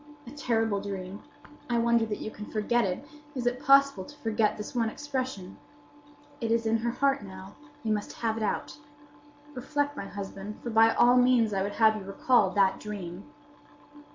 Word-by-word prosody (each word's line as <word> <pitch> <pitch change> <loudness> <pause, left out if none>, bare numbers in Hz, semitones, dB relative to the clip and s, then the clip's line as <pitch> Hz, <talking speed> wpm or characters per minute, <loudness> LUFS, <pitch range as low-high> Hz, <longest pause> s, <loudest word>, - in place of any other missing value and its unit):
"A 240 - -10
terrible 225 -7 0
dream! 195 0 -6 0.5
I 240 - +1
wonder 235 -1 +3
that 210 - -3
you 215 - -5
can 210 0 -9
forget 225 +2 +1
it. 190 +10 -4 0.3
Is 250 -2 -3
it 245 +1 0
possible 275 -7 +5
to 290 - -13
forget 215 -3 0
this 210 - -7
one 230 -3 +1
expression?—'It 270 +1 -7
is 230 0 +2
in 225 +1 +2
her 235 +1 -1
heart 275 +3 +1
now; 190 0 -10 0.3
we 220 - -1
must 210 -1 -2
have 225 -2 -1
it 225 - -4
out!' 215 +6 -2 0.7
Reflect, 290 +2 -2
my 200 - -6
husband; 200 +1 -7
for 240 - -4
by 225 +1 +6
all 245 +1 +5
means 245 -3 +4
I 195 - 0
would 200 +1 -2
have 220 -1 +4
you - - -7
recall 195 +2 +2
that 195 0 +2
dream." 195 -3 -7
225 Hz, 180 wpm, -28 LUFS, 205-250 Hz, 0.7 s, by